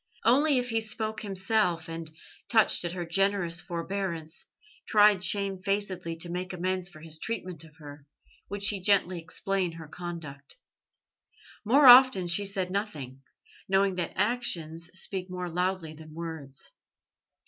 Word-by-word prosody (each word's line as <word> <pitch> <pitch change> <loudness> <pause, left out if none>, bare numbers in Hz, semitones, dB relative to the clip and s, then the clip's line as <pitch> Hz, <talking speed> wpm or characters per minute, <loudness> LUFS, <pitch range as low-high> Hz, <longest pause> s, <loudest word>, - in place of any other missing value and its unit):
Only 275 +5 +5
if 245 0 -1
he 225 0 +1
spoke 220 0 -3
himself, 190 -4 0
and, 165 -1 -4 0.4
touched 220 -5 +4
at 170 - -2
her 175 -1 -4
generous 175 -1 +1
forbearance, 170 -2 -4 0.4
tried 205 -3 +5
shamefacedly 195 -3 -1
to 165 +1 -6
make 180 +1 -4
amends 185 0 -2
for 155 -4 -14
his 160 -1 -4
treatment 185 -7 -4
of 160 -1 -16
her, 145 -2 -12 0.4
would 200 +1 -4
she 200 -1 +1
gently 185 -3 +2
explain 185 +1 -2
her 165 -1 -10
conduct. 155 -5 -8 1.1
More 270 +7 +5
often 250 -6 +9
she 175 +4 +2
said 190 -2 -2
nothing, 150 - -4 0.5
knowing 195 0 +3
that 180 -1 -3
actions 170 -8 -1
speak 185 -1 -4
more 180 0 -4
loudly 180 -2 -1
than 155 0 -13
words. 160 -5 -7
185 Hz, 135 wpm, -28 LUFS, 165-200 Hz, 1.1 s, often